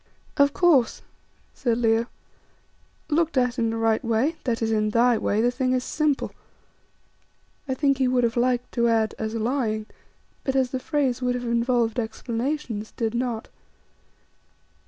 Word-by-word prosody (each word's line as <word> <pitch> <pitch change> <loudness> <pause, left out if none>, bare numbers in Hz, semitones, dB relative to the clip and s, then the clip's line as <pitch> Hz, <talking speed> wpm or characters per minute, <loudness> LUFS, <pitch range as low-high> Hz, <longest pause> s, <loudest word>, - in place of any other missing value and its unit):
"Of 280 0 +4
course," 300 -8 +3 0.5
said 235 -4 0
Leo, 230 0 +2 1.0
"looked 320 -2 +1
at 250 -1 +1
in 230 -1 +1
the 225 - -2
right 225 -1 +1
way, 235 +8 +1
that 235 -3 0
is 225 - 0
in 215 -1 +1
thy 235 +2 +4
way, 210 +2 +1
the 240 +1 +2
thing 255 0 0
is 255 -1 0
simple." 300 -1 0 1.4
I 260 - -1
think 275 -1 +1
he 260 - +3
would 250 -1 +2
have 230 -1 +1
liked 245 0 0
to 235 -1 +1
add, 225 -2 +2
"as 220 +1 -3
lying," 225 -2 -1 0.6
but 265 - -1
as 260 -2 +2
the 260 - -2
phrase 265 -3 -1
would 250 0 0
have 245 0 -4
involved 235 0 +1
explanations, 230 0 -3
did 225 -2 -1
not. 235 -2 -2
245 Hz, 155 wpm, -24 LUFS, 225-260 Hz, 1.4 s, Of